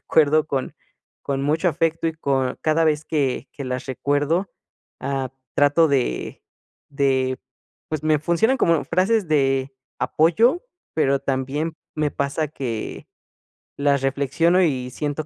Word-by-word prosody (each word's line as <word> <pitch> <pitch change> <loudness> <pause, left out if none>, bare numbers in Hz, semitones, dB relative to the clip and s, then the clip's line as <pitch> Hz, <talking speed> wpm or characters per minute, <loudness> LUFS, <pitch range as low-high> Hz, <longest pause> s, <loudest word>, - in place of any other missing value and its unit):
recuerdo 155 0 +3
con 135 -2 -2 0.5
con 135 -1 -2
mucho 160 +5 +2
afecto 165 +1 0
y 160 - -3
con 135 -5 -1
cada 155 +1 +2
vez 155 0 +1
que 140 -4 -1
que 140 - -7
las 130 +1 -4
recuerdo, 145 +7 0 0.5
ah, 135 -1 -2 0.2
trato 145 +3 +4
de 135 - -1 0.5
de, 130 -2 +1 0.5
pues, 155 -2 -3
me 155 -1 +3
funcionan 170 - +2
como 170 - +2
frases 195 0 +1
de 135 -2 +1 0.3
apoyo, 225 - +3 0.3
pero 140 -3 +2
también 140 +4 -2 0.2
me 150 -1 0
pasa 140 +2 -2
que 120 -7 -5 0.7
las 140 -1 +2
reflexiono 140 +7 +2
y 130 -6 0
siento 145 +3 -3
145 Hz, 130 wpm, -22 LUFS, 135-160 Hz, 0.7 s, trato